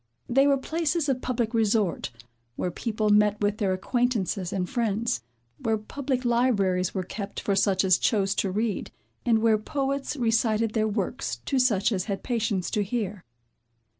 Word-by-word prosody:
They 270 +3 +4
were 280 -1 +4
places 320 +2 -1
of 255 -2 0
public 240 -2 -1
resort, 215 -4 +1 0.5
where 180 - -2
people 215 +2 -1
met 210 0 +4
with 205 0 0
their 200 -4 +1
acquaintances 200 -3 0
and 185 -2 -1
friends, 230 - -1 0.4
where 220 -1 0
public 260 +4 -3
libraries 200 -7 +2
were 190 - -1
kept 200 +2 -6
for 200 - 0
such 195 -1 +2
as 185 -1 +4
chose 200 -3 +2
to 195 - +1
read, 210 +2 -1 0.4
and 225 -2 +3
where 220 -2 +4
poets 275 +4 -2
recited 225 -2 +1
their 220 -1 +1
works 215 +4 -2
to 270 - +1
such 220 -5 +3
as 185 -4 -1
had 200 -3 -4
patience 220 -6 -1
to 210 - +1
hear. 205 -3 -3
220 Hz, 165 wpm, -26 LUFS, 195-245 Hz, 0.5 s, They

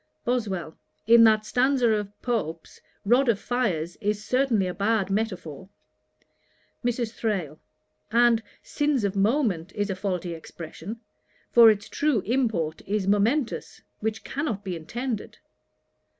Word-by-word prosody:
BOSWELL. 200 -10 -2 0.3
'In 230 +1 +7
that 215 -1 +4
stanza 250 +1 +2
of 205 -1 -2
Pope's, 170 -10 -3 0.2
"rod 245 +5 +4
of 225 - +3
fires" 185 -11 -1
is 210 0 -1
certainly 250 -6 +2
a 180 - -3
bad 200 -1 0
metaphor.' 190 -5 -3 1.1
MRS. 240 -2 -1
THRALE. 185 -11 -2 0.5
'And 235 0 +4 0.2
"sins 290 -5 0
of 200 -1 -1
moment" 200 - +1
is 205 -1 -1
a - - -2
faulty 185 -3 -3
expression; 165 +6 -8 0.5
for 235 -1 +9
its 210 -1 0
true 290 -8 +1
import 210 - -1
is 205 0 0
momentous, 225 +7 0 0.2
which 220 0 -3
cannot 250 -8 -3
be 185 -3 -4
intended.' 235 +7 -5
215 Hz, 125 wpm, -26 LUFS, 190-240 Hz, 1.1 s, for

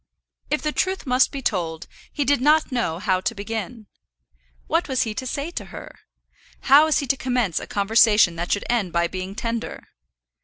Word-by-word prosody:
If 300 - -1
the 305 - 0
truth 375 +3 -1
must 255 0 +3
be 275 -1 -6
told, 165 -7 -2 0.3
he 290 - -2
did 285 -1 +2
not 300 +2 +3
know 235 -10 -1
how 185 -1 0
to 230 +3 -2
begin. 220 +2 -5 0.8
What - - 0
was 260 -2 +1
he 220 - -4
to 260 +4 -5
say 285 +6 -3
to - - -6
her? - - -10 0.7
How 280 +3 +6
was 315 - +2
he 285 - -1
to 275 - +1
commence 245 -9 -1
a - - -8
conversation 210 -3 +4
that 175 +1 -4
should 205 - 0
end 215 -8 0
by 170 0 +2
being 185 +2 -6
tender? 230 +1 -5
230 Hz, 190 wpm, -23 LUFS, 195-275 Hz, 0.8 s, How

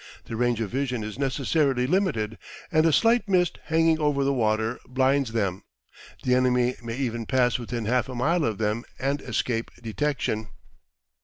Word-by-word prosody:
The 115 - -6
range 120 0 +1
of 105 - -3
vision 125 -4 -1
is 105 +4 -6
necessarily 135 -1 +1
limited, 135 - 0 0.3
and 155 0 +4
a - - +4
slight 230 +6 +3
mist 180 -3 +2
hanging 160 0 +3
over 145 -2 +1
the 140 +1 +2
water 110 -1 0
blinds 130 0 +1
them; 100 -5 -1 0.6
the 125 - +2
enemy 125 -1 +3
may 115 0 -5
even 120 -4 -2
pass 125 -2 +2
within 120 -1 -4
half 125 +4 +1
a 130 - -6
mile 155 +7 +1
of 110 -5 -1
them 110 +2 -1
and 140 +2 -1
escape 115 -1 -2
detection. 115 -2 -2
125 Hz, 165 wpm, -26 LUFS, 115-140 Hz, 0.6 s, and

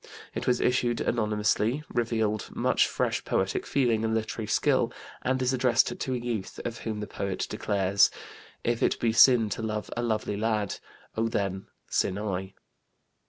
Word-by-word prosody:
It - - -4
was 125 -1 +3
issued 120 -1 +1
anonymously, 110 +4 +1
revealed 110 -3 0
much - - +3
fresh - - -1
poetic - - -1
feeling 120 -5 +2
and 110 0 +1
literary 110 0 -3
skill, 105 - +2 0.3
and 130 +1 0
is 130 +1 +1
addressed 125 -2 +2
to 130 - -2
a - - 0
youth 120 -5 -4
of 115 -1 -4
whom 110 -2 -4
the - - -3
poet 100 -2 -3
declares: 100 0 +2 0.5
"If 120 -1 0
it - - +2
be 115 -1 +1
sin 115 -1 +7
to 115 - -3
love 110 -1 -3
a 120 - -1
lovely 110 -3 -1
lad, 105 -2 0 0.4
Oh 115 +1 +1
then 100 -3 -2 0.2
sin 95 - 0
I." 95 -2 -3
110 Hz, 165 wpm, -28 LUFS, 105-120 Hz, 0.5 s, sin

